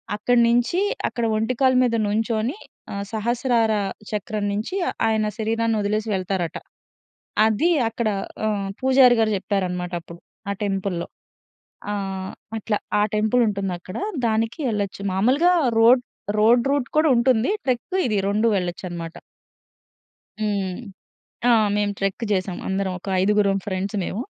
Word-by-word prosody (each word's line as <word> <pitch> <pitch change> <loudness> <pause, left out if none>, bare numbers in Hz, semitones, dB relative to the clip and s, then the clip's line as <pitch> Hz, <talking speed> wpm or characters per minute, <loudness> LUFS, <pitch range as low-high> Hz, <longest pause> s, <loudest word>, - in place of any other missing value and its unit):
అక్కడి 235 +3 +2
నుంచి, 245 +8 +2 0.3
అక్కడ 235 - -2
ఒంటికాలు 255 +3 +2
మీద 235 -2 +1
నుంచొని 225 - -1 0.4
ఆహ్, 200 0 -3
సహస్రార 230 0 +1 0.4
చక్రం 210 0 -2
నుంచి 215 - -3 0.3
ఆయన 220 -1 +1
శరీరాన్నొదిలేసి 220 -1 0
వెళ్తారట. 185 -2 -2 0.9
అది 220 +10 +2 0.2
అక్కడ 230 0 -2 0.4
ఆహ్, 200 -2 -1
పూజారి 260 -2 +6
గారు 220 -1 +2
చెప్పారన్నమాట 180 -2 -2
అప్పుడు 170 +1 -12 0.3
ఆ - - 0
టెంపుల్‌లో. 195 -3 -2 0.9
ఆ! - - -1 0.6
అట్లా. 215 0 -1 0.2
ఆ - - +4
టెంపుల్ 220 +3 +2
ఉంటుందక్కడ. 190 -1 -4 0.3
దానికి 225 +4 0
ఎళ్ళొచ్చు. 200 -2 -3
మామూలుగా 265 - +3 0.3
రోడ్ 245 +3 +6 0.4
రోడ్ 235 +3 +5
రూట్ 280 -4 0
కూడా 310 +1 +4
ఉంటుంది. 235 0 +3
ట్రెక్ 265 +9 -1
ఇదీ 215 -3 0
రొండూ 210 +3 +1
వెళ్ళొచ్చన్నమాట. 175 -2 -4 1.2
హ్మ్. 200 -4 -1 0.7
ఆ! - - +6 0.3
మేము 205 0 +1
ట్రెక్ 195 +4 -2
చేసాం. 185 -2 -1
అందరం 190 0 -1
ఒక 190 - -10
ఐదుగురం 200 0 +3
ఫ్రెండ్స్ 195 +2 -2
మేము. 210 +6 -3
215 Hz, 120 wpm, -23 LUFS, 195-235 Hz, 1.2 s, పూజారి